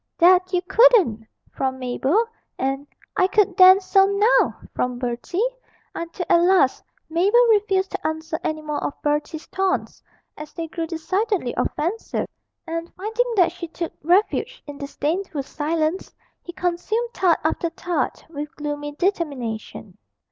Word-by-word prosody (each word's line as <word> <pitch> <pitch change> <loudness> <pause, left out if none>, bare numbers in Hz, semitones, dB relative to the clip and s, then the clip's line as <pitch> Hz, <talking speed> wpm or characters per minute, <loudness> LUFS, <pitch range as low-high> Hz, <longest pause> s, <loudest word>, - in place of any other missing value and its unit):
'That 365 +1 +5
you 360 -1 0
couldn't,' 365 - +4 0.2
from 260 -1 -2
Mabel, 265 - +1 0.3
and 270 +2 -2 0.3
'I 370 - +4
could 390 -1 +2
then, 370 +1 +8
so 390 0 +4
now!' 410 +4 +3 0.2
from 250 -1 -1
Bertie, 250 - -1 0.5
until 335 +2 -5
at 340 - +5
last 355 -7 +3 0.2
Mabel 395 +9 +4
refused 390 -3 +2
to 390 -5 -3
answer 315 0 -4
any 310 0 -2
more 300 -1 -3
of - - -4
Bertie's 300 +2 -1
taunts, 380 0 -1 0.3
as 305 0 -10
they 330 -1 -5
grew 330 +1 -4
decidedly 365 - -1
offensive; 350 +9 -2 0.4
and, 330 0 -5
finding 445 +5 -1
that 360 -4 +4
she 340 0 -7
took 335 +1 -5
refuge 360 +7 +1
in 290 -1 -9
disdainful 300 +2 -3
silence, 315 +5 -2 0.3
he 345 - -8
consumed 365 +7 -2
tart 360 -6 +3
after 320 +2 0
tart 345 +1 -3
with 295 -2 -7
gloomy 290 0 -4
determination. 290 - -3
335 Hz, 140 wpm, -22 LUFS, 295-385 Hz, 0.5 s, then